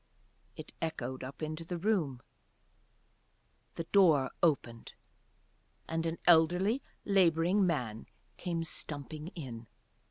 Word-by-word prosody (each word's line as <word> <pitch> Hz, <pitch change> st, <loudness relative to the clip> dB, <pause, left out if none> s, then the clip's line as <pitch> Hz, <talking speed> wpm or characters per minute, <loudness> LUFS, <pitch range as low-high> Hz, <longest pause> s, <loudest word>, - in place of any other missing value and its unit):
It -, -, -9 dB
echoed 130 Hz, -5 st, -3 dB
up 135 Hz, +2 st, -7 dB
to 155 Hz, +1 st, -4 dB
the 175 Hz, +1 st, -4 dB
room, 165 Hz, -, 0 dB, 1.5 s
the 165 Hz, -, -3 dB
door 160 Hz, -7 st, +4 dB
opened. 120 Hz, -8 st, 0 dB, 0.9 s
And 165 Hz, 0 st, -1 dB
an 165 Hz, +1 st, -2 dB
elderly 180 Hz, -, +4 dB, 0.2 s
labouring 185 Hz, 0 st, +3 dB
man 120 Hz, -10 st, -2 dB, 0.3 s
came 170 Hz, -2 st, -2 dB
stumping 155 Hz, -1 st, -5 dB
in. 120 Hz, -8 st, -7 dB
165 Hz, 100 wpm, -32 LUFS, 140-175 Hz, 1.5 s, door